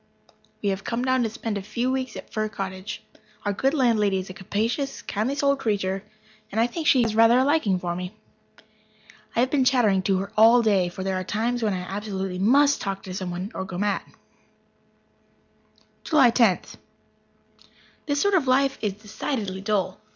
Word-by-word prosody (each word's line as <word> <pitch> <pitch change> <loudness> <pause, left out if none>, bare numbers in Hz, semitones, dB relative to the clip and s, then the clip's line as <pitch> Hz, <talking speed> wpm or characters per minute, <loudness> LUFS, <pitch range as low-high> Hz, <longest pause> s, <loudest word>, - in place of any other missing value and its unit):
We 200 - +2
have 195 0 -2
come 240 +2 -2
down 260 0 +2
to 225 - 0
spend 215 -1 -4
a - - -7
few 235 +6 -2
weeks 260 -3 -3
at - - -10
Fir 215 0 -1
Cottage. 190 -1 -6 0.4
Our 205 - +1
good 270 +8 +1
landlady 220 -7 +2
is 185 0 -5
a - - -9
capacious, 225 +9 -2
kindly 220 +7 -2
souled 280 -1 +1
creature, 195 -4 -1 0.5
and 220 - -1
I 230 - +4
think 310 +6 -4
she 255 -3 +5
has 225 -2 0
rather 230 +2 +5
a 260 - +4
liking 275 - +2
for 175 -1 -3
me. 180 +3 -6 1.2
I 235 - +3
have 255 +1 +1
been 280 -3 +3
chattering 240 -7 +3
to 195 -1 +2
her 195 +2 -4
all 230 +2 +6
day, 195 -5 +2
for 185 +2 -7
there 190 0 -1
are - - -4
times 230 +6 -1
when 210 -3 0
I 180 - -3
absolutely 195 -1 -4
must 280 +8 +4
talk 195 -1 -4
to 185 - -7
someone 185 +2 -4
or - - -4
go 185 -1 -7
mad. 205 +1 0 2.0
July 275 -7 +5
Tenth. 230 -6 +2 1.3
This 285 -1 0
sort 405 +4 +2
of 330 -8 +2
life 270 +1 +2
is 210 -3 -1
decidedly 210 -1 -4
dull. 195 -2 -1
215 Hz, 185 wpm, -24 LUFS, 190-255 Hz, 2.0 s, all